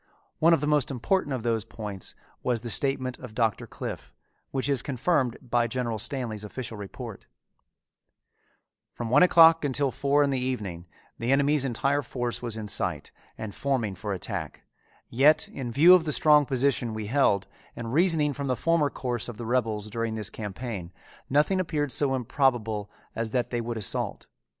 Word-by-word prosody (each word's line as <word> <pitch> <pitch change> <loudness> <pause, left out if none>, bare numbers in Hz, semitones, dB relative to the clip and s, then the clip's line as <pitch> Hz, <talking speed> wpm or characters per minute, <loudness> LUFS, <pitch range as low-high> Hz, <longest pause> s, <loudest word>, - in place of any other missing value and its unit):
One 165 +2 +5
of 165 -4 +4
the - - 0
most 150 -3 +2
important 145 +5 0
of 130 -4 -2
those 115 -3 0
points 105 -3 -7 0.3
was 120 -3 0
the 120 - -4
statement 130 0 0
of 125 -4 -10
Doctor 115 -3 0
Cliffe, - - -7 0.3
which 135 0 -1
is 140 -4 +1
confirmed 130 -1 0
by 120 -1 +1
General 115 -2 -2
Stanley's 115 -3 -3
official 115 +2 -6
report: 100 -2 -8 1.7
From 120 -1 -5
one 145 - +6
o'clock 165 -2 +7
until 140 -1 0
four 140 +3 +2
in 140 - +1
the 135 - 0
evening 105 -10 -4 0.3
the 115 +2 0
enemy's 140 +1 +3
entire 135 +3 0
force 120 -3 -3
was 115 -2 -4
in 110 -1 -5
sight - - -1 0.3
and 110 -2 -6
forming 130 -7 -1
for 100 +3 -5
attack, 95 -3 -5 0.4
yet 140 +6 +4
in 125 -3 -5
view 160 +9 +7
of 180 -3 +5
the 150 - -1
strong 150 -1 +5
position 130 -4 +1
we 110 -1 -4
held, 110 -5 +2 0.3
and 115 0 -5
reasoning 160 -3 +3
from 140 0 -4
the 130 - +1
former 165 0 +2
course 120 -4 -3
of 115 - -8
the 115 - -6
rebels 110 -3 0
during 115 0 -2
this 110 -2 -3
campaign, 105 -3 -6 0.4
nothing 150 +7 +3
appeared 150 -6 -1
so 135 -1 +1
improbable 115 -5 0 0.3
as 115 0 -2
that 125 +1 -1
they 120 -1 -1
would 115 0 -4
assault. 105 -4 -2
125 Hz, 175 wpm, -27 LUFS, 110-140 Hz, 1.7 s, o'clock